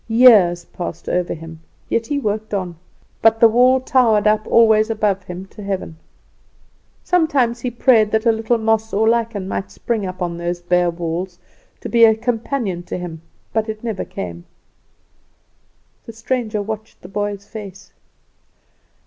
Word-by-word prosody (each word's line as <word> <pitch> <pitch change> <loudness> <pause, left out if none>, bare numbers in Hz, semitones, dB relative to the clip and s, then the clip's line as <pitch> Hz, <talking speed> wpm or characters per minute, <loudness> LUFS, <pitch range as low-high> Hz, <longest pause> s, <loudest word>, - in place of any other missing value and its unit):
Years 220 -7 +5
passed 175 -2 -7
over 180 -1 -1
him, 165 0 -10 0.3
yet 230 0 -1
he 290 - -1
worked 215 -4 -2
on; 180 -3 -3 0.5
but 225 0 +4
the 230 - +8
wall 250 +3 +4
towered 240 -5 +2
up 215 0 +2
always 220 -1 +4
above 210 -3 0
him 180 +1 -7
to - - -11
heaven. 195 -5 -4 1.1
Sometimes 285 -9 +1
he 250 - -2
prayed 235 -3 +3
that 220 +2 0
a 230 - +5
little 225 +1 0
moss 225 0 0
or 215 +3 +2
lichen 225 -4 0
might 100 - -4
spring 200 - -3
up 185 0 -7
on 170 -2 -3
those 175 +1 -3
bare 175 0 +1
walls 170 +2 -4 0.4
to - - -5
be 235 -1 +3
a 220 -1 +7
companion 230 -4 -2
to 175 - -6
him; 170 -3 -7 0.3
but 220 0 0
it 215 0 -6
never 220 -5 -3
came." 85 -2 -7 1.6
The 230 - -8
stranger 225 -2 -2
watched 220 +1 -7
the - - -9
boy's 205 0 -4
face. 200 -2 -10
215 Hz, 155 wpm, -19 LUFS, 180-230 Hz, 1.6 s, the